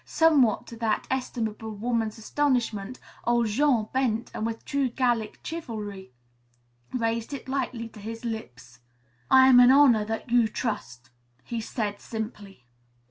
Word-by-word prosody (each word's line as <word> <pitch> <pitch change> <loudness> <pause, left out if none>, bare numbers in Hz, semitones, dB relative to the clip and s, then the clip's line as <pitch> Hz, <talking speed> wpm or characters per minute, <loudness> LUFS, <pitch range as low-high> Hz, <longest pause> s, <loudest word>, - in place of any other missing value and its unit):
Somewhat 295 -9 +3
to 230 - -10
that 225 -2 0
estimable 225 -4 -3
woman's 225 0 -1
astonishment 240 -3 -1 0.2
old 240 0 +2
Jean 230 0 +2
bent 245 -3 0
and 220 - -2
with 230 0 -6
true 280 -2 0
Gallic 240 -3 0
chivalry 210 - -6 0.8
raised 230 +1 -2
it 275 - -10
lightly 255 -3 -2
to 220 - -14
his 225 +3 -7
lips. 125 - -7 0.5
"I 260 0 +7
am 255 -2 +8
honor 250 -3 +6
that 225 +2 -5
you 240 -2 +5
trust," 130 - -5 0.3
he 235 -1 -4
said 210 -2 -3
simply. 210 - -7
230 Hz, 135 wpm, -26 LUFS, 215-255 Hz, 0.8 s, am